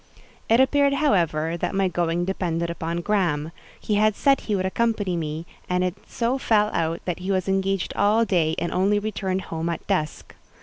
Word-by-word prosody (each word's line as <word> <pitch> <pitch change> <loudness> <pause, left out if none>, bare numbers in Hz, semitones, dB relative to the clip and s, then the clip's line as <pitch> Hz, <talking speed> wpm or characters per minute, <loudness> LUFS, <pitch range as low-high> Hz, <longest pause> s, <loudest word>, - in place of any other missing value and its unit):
It 230 +2 +5
appeared; 280 +1 +4
however, 170 - +1
that 180 - -2
my 195 -1 +2
going 175 -1 0
depended 170 -3 -2
upon 170 +1 -3
Graham; 170 -6 0 0.3
he 215 - -2
had 215 -1 +3
said 275 -1 +3
he 210 - -1
would 185 -1 -1
accompany, 205 -2 0
me, 160 0 -4 0.2
and 180 0 +1
it 180 -1 0
so 245 +3 -1
fell 210 -3 +2
out 165 0 -1
that 180 -1 -2
he 185 +2 -5
was 190 -1 0
engaged 195 -1 0
all 215 +3 +3
day, 165 -6 +1
and 170 - -2
only 195 +3 +2
returned 195 -3 -2
home 165 +1 -3
at 170 - -4
dusk. 155 -1 -2
185 Hz, 185 wpm, -24 LUFS, 170-210 Hz, 0.3 s, It